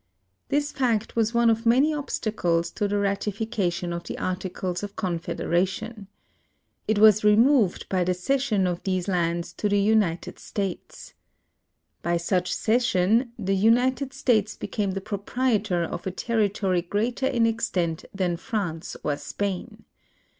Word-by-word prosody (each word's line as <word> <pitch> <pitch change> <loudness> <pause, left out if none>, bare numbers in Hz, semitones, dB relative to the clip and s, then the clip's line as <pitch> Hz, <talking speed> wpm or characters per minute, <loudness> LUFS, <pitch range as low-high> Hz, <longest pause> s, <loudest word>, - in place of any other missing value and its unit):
This 290 +1 0
fact 230 -5 0
was 225 0 +1
one 235 -1 +5
of 225 0 -1
many 270 +7 +4
obstacles 210 - -1
to 210 - -1
the 205 0 0
ratification 200 -3 -1
of 170 0 -4
the - - -5
Articles 185 -1 -3
of 205 -1 -6
Confedera 175 -2 0
tion. 215 +1 -7 0.8
It 215 - +2
was 215 0 +6
removed 220 0 +4
by 185 -2 +1
the 180 +1 0
cession 220 0 +1
of 175 -1 -1
these 185 -1 -1
lands 170 -2 -1
to 210 - -1
the 205 - +2
United 200 -5 +1
States. 195 -3 -5 0.9
By 170 +1 0
such 180 +1 0
cession 230 0 +2
the 195 -3 0
United 250 +6 +2
States 230 -6 +1
became 200 -3 -2
the 195 - -3
proi)rietor 205 -3 -1
of 175 - -6
a - - -1
territory 200 -3 0
greater 225 +9 -1
in 240 -4 +2
extent 180 -8 -1
than 180 -3 -1
France 180 -4 -4
or 145 -1 0
Spain. 200 +8 -4
205 Hz, 140 wpm, -25 LUFS, 180-230 Hz, 0.9 s, was